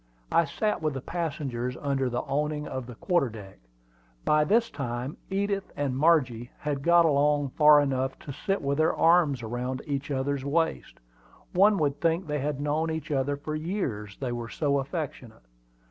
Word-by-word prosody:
I 170 - +4
sat 210 +8 -1
with 155 -3 -1
the 135 - -4
passengers 135 -8 -3
under 135 -3 0
the 120 0 -1
awning 150 +1 -2
on 130 -2 -5
the 125 - -9
quarter 175 - +1
deck. 100 - -11 0.7
By 150 0 +4
this 225 +8 +2
time 125 0 -4
Edith 200 0 -1
and 140 -3 -1
Margie 130 -6 +2
had 145 -2 -3
got 170 +2 +5
along 145 -1 +2
far 150 +2 +6
enough 135 -2 0
to 150 -7 -7
sit 195 +4 -2
with 140 +1 0
their 155 - +3
arms 165 -7 +4
around 125 +3 -3
each 140 -1 -3
other's 140 0 -1
waists. 160 +4 -1 0.6
One 200 +3 +5
would 145 -4 0
think 165 +2 +1
they 150 -1 -2
had 145 0 -2
known 150 +3 0
each 160 -1 -4
other 140 0 0
for 155 +2 -5
years, 155 - -3
they 130 -3 -3
were 120 -1 -4
so 140 0 0
affectionate. 135 - -6
145 Hz, 175 wpm, -27 LUFS, 130-160 Hz, 0.7 s, far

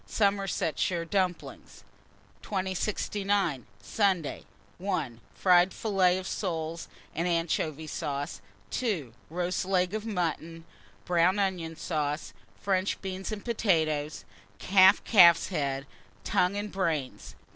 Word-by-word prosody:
Somersetshire 195 -4 0
dumplings. 185 -1 -3 0.6
2069. 195 - -1 0.2
Sunday. 185 - 0 0.3
1. 155 - -2 0.2
Fried 180 0 +4
filleted 185 -4 +1
soles 165 -4 -3 0.3
and 170 +3 -1
anchovy 160 -2 -1
sauce. 145 -6 -4 0.3
2. 175 - -2 0.2
Roast 175 +3 -1
leg 185 0 +1
of 215 -1 -2
mutton, 165 -5 -3 0.4
brown 180 +2 +3
onion 180 -5 -1
sauce, 150 -2 -3 0.3
French 190 -1 0
beans, 190 +2 -4
and 210 -1 -6
potatoes; 160 -10 0 0.4
half 190 +1 +7
calf's 175 -6 +6
head, 140 -6 -2 0.4
tongue, 180 +2 +1
and 205 0 -4
brains. 160 -8 -3
180 Hz, 100 wpm, -28 LUFS, 160-195 Hz, 0.6 s, half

